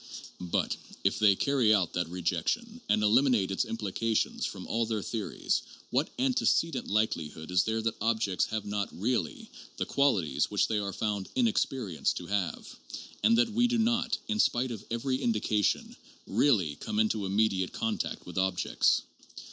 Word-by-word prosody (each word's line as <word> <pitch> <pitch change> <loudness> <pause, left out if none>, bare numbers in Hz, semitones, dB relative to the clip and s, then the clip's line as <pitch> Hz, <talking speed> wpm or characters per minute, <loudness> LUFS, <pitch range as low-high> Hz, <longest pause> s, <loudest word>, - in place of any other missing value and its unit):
But 90 -1 -1 0.3
if - - +1
they 105 -2 +5
carry 130 -2 +2
out 95 -5 0
that 90 -2 -1
rejection 90 - -2
and 105 - +3
eliminate 115 -2 +3
its 95 - 0
implications 110 +1 -1
from - - -7
all 115 0 -1
their 110 -3 -2
theories, 110 -4 -2 0.3
what 135 +5 +1
antecedent 250 - +1
likelihood 85 -7 -1
is 90 0 +3
there 110 0 -1
that 115 -2 -2
objects 110 -4 +1
have 110 -2 -4
not 100 -1 -2
"really" 105 -4 -2 0.3
the - - -1
qualities 125 - +1
which - - +2
they 110 - 0
are 100 -1 -3
found 105 -2 -2
in 250 -2 +3
experience 125 - 0
to 90 - -6
have, 100 -1 -2 0.6
and 230 0 +5
that 235 0 +3
we 240 +2 +3
do 240 0 +1
not, 235 +1 +1
in 215 -1 -1
spite 125 - +2
of 110 - -6
every 130 +3 -1
indication, 105 -3 0 0.3
"really" 95 - +2
come 105 - -4
into 110 -2 +1
immediate 95 -2 +1
contact 225 -1 -3
with 90 +1 -4
ob 95 -1 +1
jects? - - +2
110 Hz, 165 wpm, -29 LUFS, 95-135 Hz, 0.6 s, they